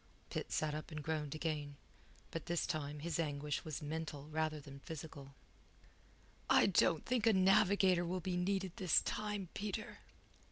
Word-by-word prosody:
Pitt - - -3
sat 155 -1 0
up 155 0 -5
and 155 -3 -5
groaned 155 -1 -2
again. 150 -3 -2 0.6
But 165 0 -5
this 170 -1 +1
time 145 -1 -3
his 170 +1 -2
anguish 145 -2 -1
was 155 0 -5
mental 150 -1 -4
rather 155 0 0
than 140 -1 -10
physical. 140 -2 -8 1.1
"I - - +7
don't 175 -4 +3
think 240 -3 +1
a 225 - +7
navigator 190 -1 +5
will 180 +2 -1
be 180 +1 -2
needed 190 +1 0
this 185 -4 +4
time, 210 -4 -2
Peter." 210 +1 -4
160 Hz, 155 wpm, -37 LUFS, 150-185 Hz, 1.1 s, I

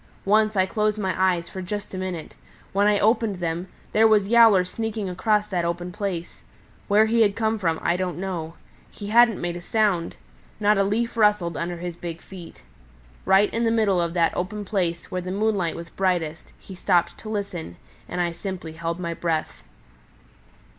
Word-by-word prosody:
Once 215 +1 +3
I 190 -1 +4
closed 210 +2 0
my 190 -3 -1
eyes 180 -2 +1
for 190 - -7
just 205 +3 -5
a - - -4
minute. 185 -4 -5 0.4
When 200 +1 +3
I 210 -1 +4
opened 220 0 +2
them, 175 0 -3 0.2
there 220 +1 +5
was 210 -3 +3
Yowler 225 -6 +6
sneaking 220 +1 -4
across 210 +3 +1
that 180 -3 -1
open 175 +1 -3
place. 180 -4 -5 0.5
Where 210 +2 +5
he 230 +1 +2
had 205 -3 +3
come 220 -1 0
from, 165 -4 0
I 170 - +2
don't 180 -3 -2
know. 175 -3 -4 0.3
He 205 -1 -8
hadn't 235 -1 +5
made 175 0 -3
a 175 - -6
sound. 200 -3 0 0.4
Not 210 -1 +3
a - - +4
leaf 230 +4 -1
rustled 210 -6 +2
under 170 +2 -3
his 175 0 -5
big 170 -1 -6
feet. 175 - -12 0.6
Right 195 +2 +4
in 230 - 0
the 230 - +3
middle 215 -5 +2
of 170 0 -2
that 170 -2 +2
open 205 +3 -3
place, 175 -4 -2
where 185 - -2
the 180 - -6
moonlight 200 -3 0
was 170 0 -8
brightest, 175 -4 -1
he 195 - -12
stopped 180 -1 +1
to 215 - -8
listen, 195 - -4 0.3
and - - -4
I 175 -1 +1
simply 170 -1 -6
held 165 +2 -4
my 170 -2 -3
breath." 160 - -2
190 Hz, 190 wpm, -24 LUFS, 170-210 Hz, 0.6 s, Yowler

